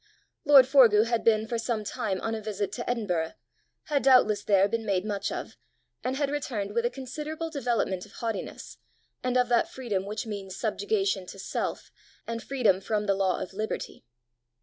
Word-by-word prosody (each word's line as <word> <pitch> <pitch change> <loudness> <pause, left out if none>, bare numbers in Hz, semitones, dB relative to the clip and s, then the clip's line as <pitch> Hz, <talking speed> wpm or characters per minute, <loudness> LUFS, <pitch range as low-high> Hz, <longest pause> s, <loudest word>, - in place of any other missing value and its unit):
Lord 280 -3 +8
Forgue 235 -6 +6
had 235 -1 0
been 220 -1 +3
for 230 +1 -2
some 225 -2 -1
time 200 -2 -2
on 225 - -2
a 220 - -3
visit 205 -2 -3
to 235 +3 -5
Edinburgh, 180 -9 -1 0.5
had 290 -2 0
doubtless 255 -6 +5
there 195 -1 +4
been 230 +2 -2
made 195 -2 0
much 205 -2 -2
of, - - -6 0.5
and 255 +1 -1
had 285 0 0
returned 220 -9 -3
with 235 +1 +2
a - - -2
considerable 305 +5 -5
development 235 - -1
of - - -20
haughtiness, 230 -2 -5 0.4
and 255 0 +1
of 250 -1 +3
that 240 -1 +3
freedom 205 -7 -3
which 215 +3 -4
means 200 -3 -6
subjugation 390 - -1
to - - -9
self, 190 - -4 0.3
and 230 0 -4
freedom 225 -9 +2
from 210 +1 -1
the 200 - +3
law 190 -1 +1
of 190 - -6
liberty. 215 -7 -4
225 Hz, 180 wpm, -28 LUFS, 200-255 Hz, 0.5 s, Lord